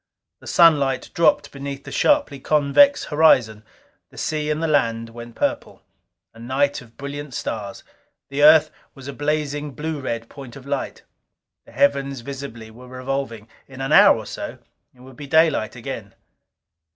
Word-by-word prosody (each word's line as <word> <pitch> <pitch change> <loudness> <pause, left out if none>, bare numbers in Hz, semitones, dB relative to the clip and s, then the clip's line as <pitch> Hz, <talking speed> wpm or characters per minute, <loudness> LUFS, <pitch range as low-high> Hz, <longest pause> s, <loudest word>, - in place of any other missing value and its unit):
The - - -15
sunlight 140 -6 +3
dropped 150 -3 +2
beneath 140 0 -7
the - - -10
sharply 285 - +1
convex 150 - +3
horizon; 125 -9 +3 0.5
the - - -18
sea 150 -1 -2
and 150 0 -1
the - - +1
land 115 -6 0
went 120 0 -11
purple. - - -3 0.5
A 115 - -16
night 140 +4 -1
of 115 -2 -18
brilliant 140 -1 -7
stars; 105 -3 -5 0.5
the 140 +1 -3
Earth 155 +1 +7 0.2
was 135 -1 -11
a 140 - -6
blazing 145 -1 -2
blue 155 +3 -4
red 115 -4 -4
point 135 -3 -11
of 135 - -12
light. 140 -1 -4 0.6
The - - -15
heavens 140 0 +1
visibly 120 -4 -8
were 125 +3 -14
revolving; 130 -3 -5 0.2
in 135 -1 -13
an 135 +2 -3
hour - - +7
or - - -7
so - - -7 0.3
it 125 - -22
would 130 -1 -15
be 145 - -9
daylight 160 -7 +2
again. 115 -5 -7
140 Hz, 160 wpm, -22 LUFS, 120-150 Hz, 0.6 s, Earth